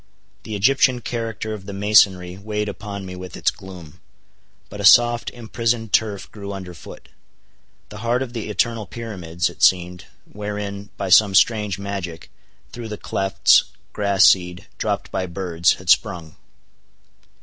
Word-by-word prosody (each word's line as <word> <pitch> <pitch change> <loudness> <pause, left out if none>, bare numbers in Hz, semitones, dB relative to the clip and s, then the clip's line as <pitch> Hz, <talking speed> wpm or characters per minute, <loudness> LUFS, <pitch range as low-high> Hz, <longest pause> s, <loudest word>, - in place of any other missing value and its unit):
The 110 - -6
Egyptian 125 +3 +3
character 115 -2 -4
of 100 -2 -9
the 100 - -6
masonry 95 -3 +3
weighed 105 +1 -4
upon 100 -1 -7
me 90 0 -8
with 90 0 -9
its - - +1
gloom. 90 -4 -13 0.7
But 105 - -8
a - - -5
soft 120 +2 +5
imprisoned 115 -1 -3
turf 105 -3 0
grew 100 -1 -7
under 95 -2 -8
foot. 85 - -13 0.8
The 105 - -10
heart 120 +3 0
of 120 -2 -9
the 115 -3 -5
eternal 110 +1 -1
pyramids, 90 -7 -4
it - - -10
seemed, 90 -1 +2 0.2
wherein, 105 -1 -6
by 100 -1 -3
some 100 +1 +6
strange 105 -1 +3
magic, 95 -4 -6 0.4
through 120 -2 -7
the 105 -1 -6
clefts, 95 -1 +3 0.3
grass 100 -2 +3
seed, 90 -1 +3
dropped - - -2
by 95 - -2
birds, 85 -1 0
had 90 - -15
sprung. 85 -7 0
100 Hz, 150 wpm, -21 LUFS, 95-110 Hz, 0.8 s, some